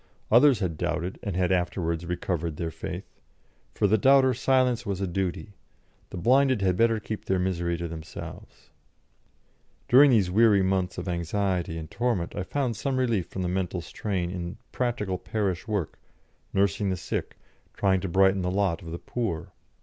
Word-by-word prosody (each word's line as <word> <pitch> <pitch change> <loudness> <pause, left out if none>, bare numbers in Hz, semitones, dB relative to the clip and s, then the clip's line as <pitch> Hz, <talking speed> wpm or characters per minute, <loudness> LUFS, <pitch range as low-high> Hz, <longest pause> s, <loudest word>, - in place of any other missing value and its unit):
Others 125 0 +6
had 85 -5 -2
doubted 90 +4 -2
and 100 -4 -4
had 90 0 +1
afterwards 85 -2 -1
recovered 85 -3 -2
their 80 -1 -3
faith; - - -6 0.7
for - - +1
the 105 +2 +3
doubter 135 +2 +5
silence 125 -1 +2
was 100 -5 -3
a 100 - 0
duty; 95 +2 -3 0.6
the - - -7
blinded 130 +2 +3
had 95 -2 +2
better 115 +2 +3
keep 105 0 -6
their 95 - +1
misery 85 -2 -1
to 85 0 -4
themselves. 80 -1 -9 1.2
During 140 +4 +7
these 105 -8 +3
weary 105 -1 +5
months 95 -1 0
of 90 - -5
anxiety 90 0 -1
and 80 -1 -7
torment 115 -8 -1
I - - -2
found 125 +4 -2
some 135 +4 -2
relief 115 -8 +1
from 95 - -5
the - - -1
mental 90 -1 -2
strain 90 -1 -3
in 90 0 -5
practical 105 -7 -2
parish 100 -2 -2
work, 100 -8 -2 0.5
nursing 100 +1 +1
the 95 - -1
sick, 90 - -4 0.4
trying 95 -2 +2
to 95 - -3
brighten 95 +2 +4
the 90 - -1
lot 95 -1 0
of 85 - -9
the 85 - -4
poor. 85 -7 -4
95 Hz, 170 wpm, -27 LUFS, 90-110 Hz, 1.2 s, During